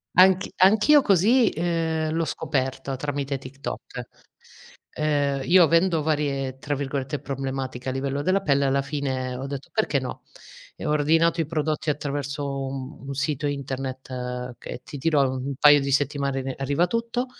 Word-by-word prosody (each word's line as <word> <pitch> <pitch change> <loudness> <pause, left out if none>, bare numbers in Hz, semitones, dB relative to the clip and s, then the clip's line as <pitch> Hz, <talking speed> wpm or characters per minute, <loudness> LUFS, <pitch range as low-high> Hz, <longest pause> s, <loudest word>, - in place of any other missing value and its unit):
Anch 190 +1 +5
anch'io 215 +10 +6
così, 220 +4 +4
ehm, 160 -1 -1
l'ho 165 0 0
scoperto 135 -2 -2
tramite 140 0 -2
TikTok. 135 +1 -7 0.9
Ehm, 145 -2 0
io 180 +1 +7
avendo 165 +1 +3
varie, 140 -4 -1
tra 145 +1 -2
virgolette, 140 +1 -3
"problematiche" 135 -2 -4
a 130 - 0
livello 140 +1 -2
della 185 +5 +2
pelle 140 -4 +2
alla 135 0 +2
fine 135 -3 -3
ho 130 +2 -5
detto: 140 -1 -6
"Perché 215 -10 +1
no?" 130 -1 -6 0.5
E - - -6
ho - - 0
ordinato 160 +3 +3
i 160 - 0
prodotti 155 0 -1
attraverso 140 -1 -3
un 135 +2 -7
un 140 0 -5
sito 145 +1 -1
internet 130 -2 -5
che, - - -7
ti - - -8
dirò, 140 -1 +2
un 130 0 -4
un 140 0 -3
paio 145 -1 +7
di 140 0 -2
settimane 140 -1 0
re 130 0 -4
arriva 140 +5 +1
tutto; 230 +5 -2
140 Hz, 160 wpm, -24 LUFS, 135-160 Hz, 0.9 s, io